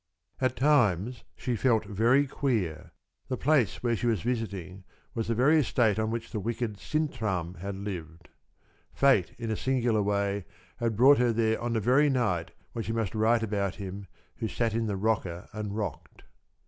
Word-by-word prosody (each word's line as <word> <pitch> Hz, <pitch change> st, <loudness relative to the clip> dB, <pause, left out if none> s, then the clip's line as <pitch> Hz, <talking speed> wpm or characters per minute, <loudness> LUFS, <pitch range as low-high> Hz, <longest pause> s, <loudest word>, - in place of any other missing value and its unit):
At 130 Hz, -1 st, +1 dB
times 120 Hz, -, +2 dB
she 125 Hz, -2 st, -2 dB
felt 110 Hz, -2 st, +2 dB
very 115 Hz, +7 st, +3 dB
queer. 120 Hz, -, -2 dB, 0.4 s
The 130 Hz, -, -2 dB
place 130 Hz, -, +2 dB
where 120 Hz, -1 st, +2 dB
she 120 Hz, -, -2 dB
was 110 Hz, -6 st, +1 dB
visiting 100 Hz, -6 st, -3 dB, 0.3 s
was 115 Hz, -2 st, -2 dB
the 115 Hz, -, 0 dB
very 145 Hz, +7 st, +5 dB
estate 115 Hz, -6 st, +2 dB
on 110 Hz, 0 st, 0 dB
which 115 Hz, 0 st, -4 dB
the 110 Hz, -, -2 dB
wicked 115 Hz, -1 st, -3 dB
Sintram 110 Hz, -, -2 dB
had 100 Hz, +2 st, -4 dB
lived. 85 Hz, -5 st, -7 dB, 0.7 s
Fate, 135 Hz, -10 st, +3 dB
in 115 Hz, -2 st, -4 dB
a -, -, 0 dB
singular 120 Hz, -3 st, +1 dB
way, 100 Hz, -1 st, 0 dB, 0.3 s
had 115 Hz, -2 st, -1 dB
brought 135 Hz, +5 st, +6 dB
her 125 Hz, -1 st, +3 dB
there 110 Hz, -1 st, +1 dB
on 120 Hz, 0 st, -1 dB
the 115 Hz, -, +1 dB
very 130 Hz, +7 st, +4 dB
night 105 Hz, -, 0 dB, 0.2 s
when 115 Hz, -, -3 dB
she 115 Hz, -, -3 dB
must 115 Hz, -4 st, -1 dB
write 115 Hz, +1 st, +2 dB
about 100 Hz, -3 st, -1 dB
him 100 Hz, -1 st, -7 dB, 0.3 s
who 110 Hz, -, -2 dB
sat 115 Hz, 0 st, -1 dB
in 115 Hz, 0 st, 0 dB
the 100 Hz, -2 st, -2 dB
rocker 95 Hz, -5 st, -1 dB
and 105 Hz, -1 st, -4 dB
rocked. 105 Hz, -2 st, -5 dB
110 Hz, 175 wpm, -28 LUFS, 100-120 Hz, 0.7 s, brought